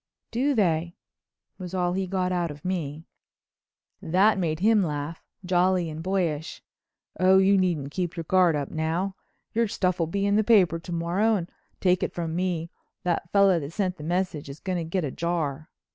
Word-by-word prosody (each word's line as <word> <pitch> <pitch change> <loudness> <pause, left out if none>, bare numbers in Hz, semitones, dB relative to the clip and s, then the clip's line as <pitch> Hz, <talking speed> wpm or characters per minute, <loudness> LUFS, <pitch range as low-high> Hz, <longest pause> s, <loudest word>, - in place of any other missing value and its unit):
"Do 265 +5 +1
they?" 170 -5 +1 0.6
was 185 0 -6
all 180 -1 +1
he 190 0 -1
got 185 -1 -1
out 175 -2 0
of 150 +1 -10
me. 160 -4 -3 1.0
That 195 +5 +3
made 160 -3 -1
him 215 +1 +4
laugh, 150 -1 -3 0.2
jolly 180 -1 +2
and 155 +1 -6
boyish. 170 -4 -2 0.6
"Oh, 185 +1 +6
you 195 +1 +5
needn't 170 -7 0
keep 180 0 -3
your 165 - -2
guard 180 -1 +3
up 145 -2 -3
now. 165 +5 -1 0.4
Your 230 0 +2
stuff'll 180 -4 0
be 200 +3 -1
in 200 +1 +3
the 215 - +3
papers 185 -7 +4
to 180 - -7
morrow, 175 +7 +1
and, 175 -3 -4 0.3
take 180 -1 +2
it - - -2
from 165 -2 -3
me, 175 -2 -2 0.3
that 170 -1 -1
fellow 195 -3 +5
that 145 +1 -7
sent 185 -2 -1
the 150 - -9
message 175 -3 -2
is 140 +2 -9
going 185 -2 -2
to - - -2
get 165 +1 -2
a 135 - -3
jar." 160 -2 -2
180 Hz, 185 wpm, -26 LUFS, 165-190 Hz, 1.0 s, Oh